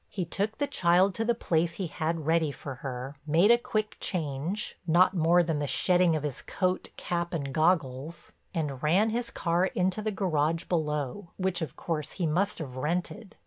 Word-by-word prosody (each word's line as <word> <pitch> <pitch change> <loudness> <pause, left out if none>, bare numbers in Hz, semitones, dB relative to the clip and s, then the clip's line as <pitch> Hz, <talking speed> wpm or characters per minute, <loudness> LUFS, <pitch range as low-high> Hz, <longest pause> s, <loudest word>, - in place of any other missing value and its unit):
He 185 -4 -3
took 205 +6 -2
the 290 - +1
child 185 -7 +3
to 225 - -1
the 235 +1 +1
place 170 -5 0
he 190 - -3
had 160 0 -2
ready 160 -1 +2
for 140 0 -7
her, 135 +1 -5
made 170 +8 +5
a 235 - +7
quick 215 -2 -2
change—not 170 +3 0
more 175 0 +4
than 160 -3 -1
the 145 - -1
shedding 180 +2 +3
of 155 - -2
his 145 -4 -3
coat, 185 -1 -1
cap 170 0 -2
and 140 -4 -3
goggles—and 155 -1 -1
ran 190 +9 +3
his 235 +1 -2
car 175 +2 +1
into 185 +3 0
the 215 - -1
garage 165 -5 0
below, 155 +1 -2
which 185 -2 0
of 155 -5 -4
course 155 -3 -3
he 180 - -2
must 185 +6 +1
have 130 -5 -7
rented. 180 - -3
170 Hz, 180 wpm, -28 LUFS, 150-190 Hz, -, a